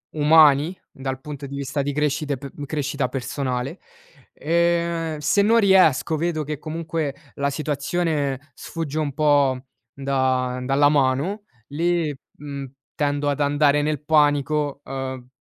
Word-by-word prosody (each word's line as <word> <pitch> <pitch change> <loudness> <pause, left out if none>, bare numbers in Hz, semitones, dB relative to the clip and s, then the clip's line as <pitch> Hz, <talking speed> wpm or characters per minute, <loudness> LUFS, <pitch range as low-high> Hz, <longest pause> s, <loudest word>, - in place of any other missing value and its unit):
umani 150 +1 +5 0.2
dal 135 -1 -5
punto 145 0 -7
di 140 - -7
vista 140 +1 -2
di 145 - -1
crescita 150 0 0
e - - -3
pe 140 +1 -9
crescita 145 -1 -2
personale, 130 +3 -3 0.5
ehm, 170 -1 0
se 150 +7 +2
non 225 +3 +4
riesco, 185 - +4
vedo 160 -1 -1
che 150 +1 -4
comunque 160 -1 -3 0.2
la 140 0 0
situazione 145 -1 -2
sfugge 155 +1 -5
un 150 -3 -1
po' 140 -3 +2 0.3
da 130 -2 0
dalla 140 +2 +3
mano, 145 +9 +1 0.2
lì, 165 +1 0 0.3
mhmm, 140 -1 -6 0.3
tendo 145 0 0
ad 145 +1 -1
andare 145 0 +3
nel 150 -1 -2
panico, 145 -1 +2
uhm 130 -1 -5
145 Hz, 130 wpm, -23 LUFS, 135-155 Hz, 0.5 s, umani